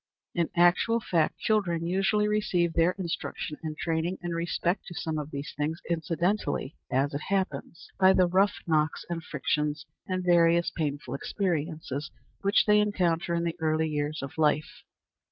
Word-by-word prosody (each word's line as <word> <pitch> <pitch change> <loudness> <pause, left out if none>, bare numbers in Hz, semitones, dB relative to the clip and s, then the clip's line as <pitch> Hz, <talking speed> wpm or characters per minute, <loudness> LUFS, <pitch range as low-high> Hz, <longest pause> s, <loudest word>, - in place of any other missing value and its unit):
In 170 -2 0
actual 175 +7 +4
fact, 170 -8 0
children 175 -6 0
usually 195 +4 +2
receive 180 -5 +1
their 170 +2 +3
instruction 165 -4 -4
and 155 -2 -5
training 165 +2 -1
in 175 - -3
respect 170 +2 -1
to 175 - -8
some 160 -3 -2
of 150 0 -5
these 140 0 -6
things 155 +3 -2
incidentally 170 -1 -1
as 135 +2 +1
it 140 - -3
happens 190 -4 -2
by 190 0 +7
the 185 - +5
rough 190 +3 +3
knocks 155 -2 +1
and 165 -1 -3
frictions, 150 0 -1 0.2
and 185 -1 -1
various 170 -1 +4
painful 145 -3 -3
experiences 155 -4 -2 0.3
which 200 +2 +3
they 210 0 +5
encounter 175 -5 +1
in 170 - 0
the 170 -1 -1
early 160 0 +1
years 150 0 -2
of 150 +4 -7
life. 150 0 +1
170 Hz, 155 wpm, -28 LUFS, 155-185 Hz, 0.3 s, by